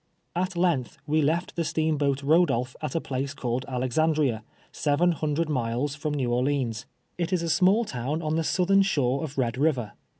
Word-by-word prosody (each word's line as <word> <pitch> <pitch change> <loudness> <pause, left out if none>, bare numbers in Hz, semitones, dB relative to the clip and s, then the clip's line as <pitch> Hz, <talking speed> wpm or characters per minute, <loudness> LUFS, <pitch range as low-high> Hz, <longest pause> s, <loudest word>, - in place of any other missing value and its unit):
At 185 +1 -1
lenn 170 -8 +2
th - - -20
we 155 +1 +2
k'ft 165 +5 0
the 170 - -2
steamhoat 150 -4 0
Ttodolpli 140 -5 +2
at 155 - -3
aplaco 140 -4 -3
called 125 +1 -2
Ak'xamlria, 130 0 +1 0.3
several 155 +4 +2
liiiiidrfd 155 +1 -1
miles 130 0 -1
I'rom 150 0 -2
New 125 -4 0
Orleans. 125 -3 -1 0.3
It 175 +1 -1
is 180 -2 +1
a 165 - -2
small 195 +7 +4
town 140 - -3
un 155 0 0
the 165 - +1
southern 190 +4 +3
shore 140 -7 +1
of 145 -3 -6
lied 125 -1 0
River. 130 -8 +1
145 Hz, 175 wpm, -26 LUFS, 130-165 Hz, 0.3 s, small